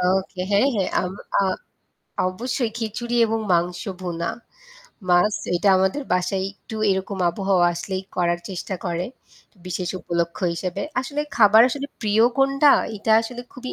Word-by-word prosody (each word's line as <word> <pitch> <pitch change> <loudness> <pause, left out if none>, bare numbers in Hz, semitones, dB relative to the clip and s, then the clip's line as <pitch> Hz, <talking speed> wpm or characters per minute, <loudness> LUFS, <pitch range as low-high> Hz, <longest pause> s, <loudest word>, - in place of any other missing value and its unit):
ওকে, 185 +1 0
হ্যাঁ, 205 +6 +4
হ্যাঁ। 195 -4 0
আম 180 - -3 0.3
আ - - +3 0.9
অবশ্যই 240 +5 -2
খিচুড়ি 235 +2 -3
এবং 225 0 -1
মাংস 175 0 +1 0.2
ভুনা, 170 -2 -3 0.8
মাছ, 180 +4 +4 0.2
এটা 200 +4 +1
আমাদের 190 +10 +1
বাসায় 180 +1 0
একটু 220 +2 -10
এরকম 190 +1 -2
আবহাওয়া 190 -1 +2
আসলেই 185 +2 -4
করার 175 -1 +1
চেষ্টা 190 0 -4
করে 175 -1 -1 0.6
বিশেষ 180 0 -3
উপলক্ষ্য 170 0 -2
হিসেবে। 180 +1 -3 0.2
আসলে 285 +3 -3 0.2
খাবার 220 0 +7
আসলে 280 +2 -4
প্রিয় 215 +1 +3
কোনটা 275 +2 +5 0.3
এটা 215 +2 +1
আসলে 245 +1 -6
খুবই 255 0 -7
190 Hz, 140 wpm, -23 LUFS, 180-225 Hz, 0.9 s, খাবার